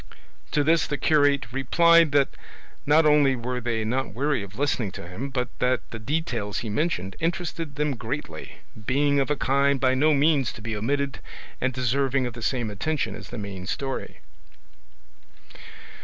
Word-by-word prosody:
To 145 - +3
this 165 +2 +3
the 145 - -2
curate 145 -3 +3
replied 170 +4 +4
that 145 -1 +3 0.6
not 155 +2 +5
only 145 -3 +5
were 125 +1 -4
they 115 -2 -1
not 125 0 -2
weary 140 -1 0
of 100 +1 -10
listening 130 -8 0
to - - -8
him, 110 +11 -5
but 125 -2 -2
that 125 0 +2
the 115 - -6
details 115 -5 -2
he 110 - -3
mentioned 105 - -1
interested 165 -3 -3
them 150 -1 0
greatly, 125 +6 -6 0.3
being 140 +2 +2
of 135 - 0
a 150 - +2
kind 140 0 +2
by 130 0 +3
no 150 +3 +3
means 145 -2 +3
to 115 - -11
be 115 -1 -3
omitted 140 +6 -1 0.4
and 130 - +1
deserving 130 +1 0
of 120 - -4
the 120 - -9
same 120 -2 -1
attention 150 +9 -2
as - - -10
the - - -7
main 95 -3 -6
story. 135 +3 -4
135 Hz, 170 wpm, -25 LUFS, 120-145 Hz, 0.6 s, not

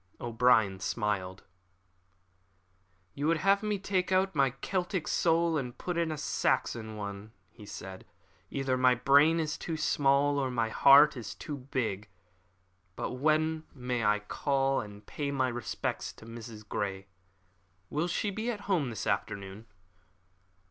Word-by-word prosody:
O'Brien 115 -5 +3
smiled. 95 -2 -2 1.7
"You 145 +2 -2
would 165 0 +3
have 195 +4 +3
me 210 -1 -1
take 190 -1 -1
out 190 +1 +2
my 135 -3 +3
Celtic 180 +6 -3
soul 165 -1 +2
and 125 -3 -6
put 180 - -3
in 165 -1 0
a 155 - -3
Saxon 110 -5 -1
one," 100 +1 -7 0.2
he 105 +1 -14
said. 95 -2 -8 0.5
"Either 135 -2 -1
my 130 0 +4
brain 140 +6 +5
is 155 -2 -2
too 165 -2 -4
small 145 -1 +2
or 135 -2 0
my 120 -3 0
heart 140 +5 +7
is 115 -4 -7
too 150 - -6
big. 120 -6 -3 0.9
But - - -3
when 155 +4 +1
may 125 -3 -2
I 105 0 +3
call 135 +5 0
and 105 0 -11
pay 145 -2 -4
my 130 -2 +1
respects 120 -2 -3
to - - -15
Mrs. 115 -2 -10
Grey? 95 -2 -3 0.9
Will 155 +4 0
she 200 +4 -1
be 220 +4 -3
at 215 -4 -3
home 180 -10 0
this 110 - -5
afternoon?" 100 +3 -3
135 Hz, 145 wpm, -30 LUFS, 110-160 Hz, 1.7 s, heart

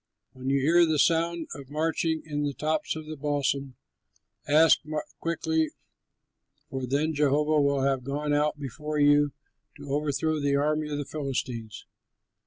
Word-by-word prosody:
When 130 +1 -5
you 140 0 +3
hear 165 +6 +5
the 160 -1 +1
sound 165 +2 +2
of 140 -2 -10
marching 160 +1 -1
in 150 -1 -3
the 145 -2 -2
tops 155 +1 -1
of 155 -1 -7
the 155 0 -6
balsams, 140 -2 -1 0.7
act 155 +2 +6 0.4
quickly, 160 -1 0 1.0
for 130 -1 -3
then 150 +5 0
Jehovah 150 +1 +2
will 140 -1 +2
have 135 -2 +1
gone 145 +3 -2
out 150 0 +1
before 150 +3 -5
you 145 0 +4 0.5
to 140 - -8
overthrow 150 +2 0
the 140 -1 +1
army 150 +1 0
of 145 - -2
the 145 - -3
Philistines." 125 -7 -4
145 Hz, 150 wpm, -27 LUFS, 140-155 Hz, 1.0 s, act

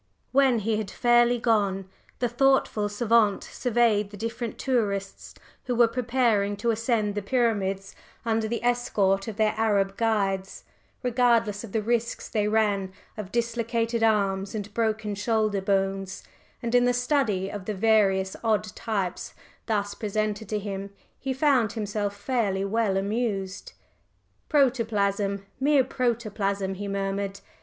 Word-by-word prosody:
When 265 -2 +4
he 220 0 0
had 215 -3 -3
fairly 240 0 +3
gone, 200 -5 +1 0.3
the 245 - 0
thoughtful 265 -5 +2
savant 215 -1 +2
surveyed 230 -4 +1
the 205 - -10
different 230 +2 -4
tourists 200 -7 -2 0.3
who 245 - -1
were 235 0 +6
preparing 230 -4 +1
to 230 +3 +1
ascend 225 -2 0
the 205 - -2
Pyramids 200 -4 0 0.3
under 225 -1 +1
the 235 +1 -3
escort 205 -5 +1
of 220 - -5
their 215 -1 +2
Arab 200 -3 +1
guides, 195 -4 0 0.4
regardless 235 -4 +2
of 225 - -9
the 220 0 -1
risks 235 +1 -1
they 210 -2 0
ran 205 -3 +1 0.2
of 210 -3 -7
dislocated 235 0 -1
arms 200 -3 +1
and 205 -1 -5
broken 220 -2 -1
shoulder 210 -1 0
bones, 195 -1 -1 0.4
and 235 0 -2
in 245 0 +5
the 245 - +3
study 245 -7 0
of 205 -3 -6
the 215 - -3
various 195 -2 +2
odd 215 -2 +2
types 200 -5 -3 0.3
thus 205 -2 0
presented 215 0 -2
to 215 - 0
him, 200 -1 -5 0.3
he 270 - -3
found 260 -5 +2
himself 205 -2 -2
fairly 205 -4 0
well 205 -1 +1
amused. 200 -2 -2 0.8
"Protoplasm 210 -8 +1
mere 280 0 +4
protoplasm!" 215 -6 -1
he 200 +2 -5
murmured. 195 0 -2
215 Hz, 135 wpm, -26 LUFS, 200-235 Hz, 0.8 s, were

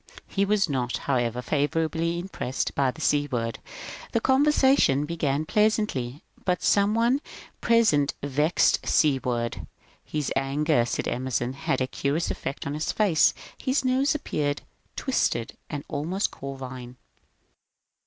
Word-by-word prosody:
He 200 0 0
was 200 -1 +2
not, 125 -4 -1
however, 125 -2 0
favourably 160 +5 0
impressed 175 -8 -3
by 135 -2 +2
Seward. 130 -6 0 0.5
The 230 - +3
conversation 265 - +4
began 150 -2 -1
pleasantly, 210 - 0 0.2
but 180 -2 0
some 200 +1 +3
one 240 +5 +2 0.4
present 215 -12 +3
vexed 150 +4 +2
Seward. 125 -5 +2
^^ 80 -4 -9 0.4
His 150 -2 -3
anger," 135 -1 +1
said - - -2
Emerson, 125 -1 -1
^ - - -13
had 160 0 -1
a - - +3
curious 140 +5 -1
effect 135 - -5
on 140 - -3
his 155 +1 -1
face; 195 -8 +3 0.2
his 265 +1 0
nose 265 +4 +2
appealed 145 - -2 0.3
twisted 115 -1 0
and 145 -2 -4
almost 170 +8 -1
corvine." 130 -2 -8
150 Hz, 125 wpm, -26 LUFS, 130-195 Hz, 0.5 s, conversation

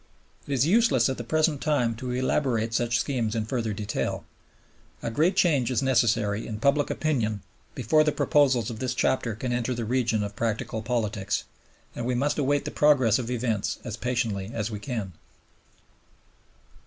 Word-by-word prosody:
It - - -6
is 135 -1 +2
useless 175 - +3
at 130 - -2
the - - -3
present 155 +2 +1
time 135 -7 +1
to 125 +1 -5
elaborate 125 -3 0
such 115 0 +1
schemes 120 -6 -1
in 110 -1 -1
further 115 -1 -2
detail. 105 0 -3 0.8
A 115 - -2
great 165 - +2
change 145 -10 +3
is 130 +1 0
necessary 115 -5 +1
in 110 -1 -5
public 140 +4 +2
opinion 110 -10 -1 0.3
before 155 +6 +3
the 150 - +2
proposals 130 -7 +2
of 110 - -7
this 125 -1 -2
chapter 120 -4 0
can 120 +3 -3
enter 125 +1 -1
the 115 -1 -3
region 115 -2 +1
of 100 0 -5
practical 110 0 -2
politics, 105 -4 -1 0.5
and 120 - -3
we 125 - 0
must 145 +4 0
await 145 0 +1
the - - -3
progress 130 -7 +4
of 120 -2 -4
events 115 -4 -1
as - - -5
patiently 115 -5 -2
as 115 -1 -3
we 105 - -5
can. 105 -5 -4
120 Hz, 170 wpm, -26 LUFS, 110-135 Hz, 0.8 s, progress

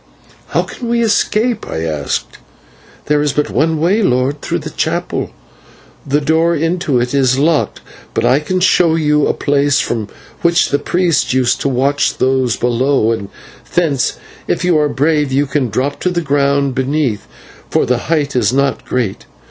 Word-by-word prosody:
"How - - 0
can 240 - -7
we 235 0 +1
escape?" 220 +1 0
I 80 - -3
asked. 75 -3 -3 0.7
"There 150 0 +2
is 150 -1 0
but 150 - -1
one 155 +4 +1
way, 185 +8 +2
lord, 130 - 0
through - - -2
the - - -7
chapel. - - -2 0.8
The 140 +2 +2
door 160 +3 +2
into 165 -3 0
it 125 +2 -2
is 130 -2 +2
locked, 155 +2 +1 0.3
but 115 - +1
I 125 +3 +4
can 185 +5 -2
show 180 -3 +4
you 150 -2 +2
a - - +1
place 145 +1 +1
from 110 -6 -2 0.3
which 170 0 +2
the 140 - +1
priests 175 -7 0
used 125 -2 +1
to 140 - 0
watch 135 +3 0
those 130 -2 +1
below, 125 0 +1
and 105 -3 -3 0.5
thence, 150 -7 +1 0.3
if 175 - -1
you 180 -2 +3
are 150 -1 +1
brave, 150 0 +1
you 140 +2 +2
can 135 -2 -1
drop 130 +7 -2
to 180 - 0
the 175 -1 -1
ground 140 -2 +1
beneath, 130 -4 -1 0.4
for - - +1
the 125 0 +1
height 145 -4 0
is 110 -5 +2
not 135 0 0
great. 115 -7 -3
145 Hz, 170 wpm, -15 LUFS, 130-160 Hz, 0.8 s, I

